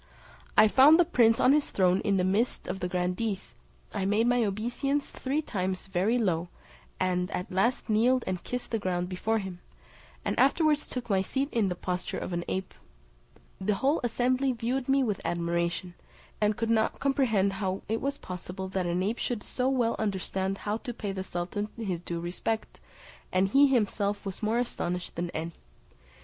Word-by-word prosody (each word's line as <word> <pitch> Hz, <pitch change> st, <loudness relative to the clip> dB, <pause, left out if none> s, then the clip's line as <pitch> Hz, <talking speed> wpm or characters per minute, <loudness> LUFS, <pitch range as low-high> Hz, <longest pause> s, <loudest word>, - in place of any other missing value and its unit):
I 215 Hz, -, +8 dB
found 280 Hz, +9 st, +7 dB
the 350 Hz, -, +6 dB
prince 230 Hz, -8 st, +4 dB
on 260 Hz, -, +6 dB
his 300 Hz, -1 st, +2 dB
throne 185 Hz, -1 st, +3 dB
in 200 Hz, -2 st, +1 dB
the 180 Hz, -, +2 dB
midst 205 Hz, +7 st, 0 dB
of 185 Hz, +1 st, -3 dB
the 180 Hz, -, -1 dB
grandees; 185 Hz, +3 st, -2 dB, 0.4 s
I 200 Hz, -, -1 dB
made 210 Hz, +3 st, +2 dB
my 245 Hz, 0 st, +3 dB
obeisance 240 Hz, +8 st, -1 dB
three 280 Hz, +4 st, -2 dB
times 185 Hz, -6 st, -2 dB
very 195 Hz, +5 st, +1 dB
low, 180 Hz, -7 st, 0 dB, 0.5 s
and 180 Hz, -1 st, 0 dB
at 180 Hz, -, -4 dB
last 195 Hz, +7 st, +1 dB
kneeled 240 Hz, +4 st, +3 dB
and 185 Hz, -2 st, -3 dB
kissed 250 Hz, 0 st, -4 dB
the 225 Hz, -, 0 dB
ground 180 Hz, -2 st, -1 dB
before 220 Hz, +5 st, 0 dB
him, 190 Hz, -4 st, -5 dB, 0.7 s
and -, -, -1 dB
afterwards 295 Hz, +3 st, +3 dB
took 250 Hz, -2 st, -5 dB
my 195 Hz, -4 st, +2 dB
seat 270 Hz, +8 st, -1 dB
in 220 Hz, -5 st, +1 dB
the 180 Hz, -, -2 dB
posture 180 Hz, 0 st, -3 dB
of 185 Hz, -, -4 dB
an 175 Hz, 0 st, -1 dB
ape. 190 Hz, 0 st, -3 dB, 0.9 s
The 200 Hz, +2 st, +1 dB
whole 275 Hz, +9 st, +1 dB
assembly 255 Hz, +3 st, +1 dB
viewed 245 Hz, +3 st, -2 dB
me 270 Hz, 0 st, +4 dB
with 210 Hz, -5 st, -1 dB
admiration, 170 Hz, +1 st, -1 dB, 0.5 s
and 210 Hz, 0 st, +2 dB
could 230 Hz, 0 st, 0 dB
not 220 Hz, -1 st, +1 dB
comprehend 235 Hz, -8 st, +2 dB
how 190 Hz, -1 st, -2 dB
it 225 Hz, +1 st, -1 dB
was 280 Hz, +1 st, -1 dB
possible 185 Hz, -1 st, -6 dB
that 185 Hz, -2 st, -1 dB
an 175 Hz, +2 st, 0 dB
ape 215 Hz, +5 st, -1 dB
should 235 Hz, -4 st, -2 dB
so 255 Hz, +1 st, -1 dB
well 245 Hz, -4 st, +1 dB
understand 195 Hz, -2 st, -1 dB
how 210 Hz, +2 st, -2 dB
to 245 Hz, 0 st, -6 dB
pay 205 Hz, -3 st, -3 dB
the 190 Hz, -1 st, -4 dB
sultan 185 Hz, +4 st, -3 dB
his 195 Hz, -7 st, -2 dB
due 170 Hz, -1 st, -4 dB
respect; 180 Hz, +6 st, -3 dB, 0.5 s
and 185 Hz, +1 st, +2 dB
he 280 Hz, +5 st, +6 dB
himself 205 Hz, -5 st, 0 dB
was 195 Hz, -2 st, -5 dB
more 220 Hz, +2 st, +1 dB
astonished 180 Hz, -7 st, -2 dB
than 170 Hz, 0 st, -2 dB
any. 165 Hz, 0 st, -4 dB
205 Hz, 185 wpm, -29 LUFS, 185-245 Hz, 0.9 s, I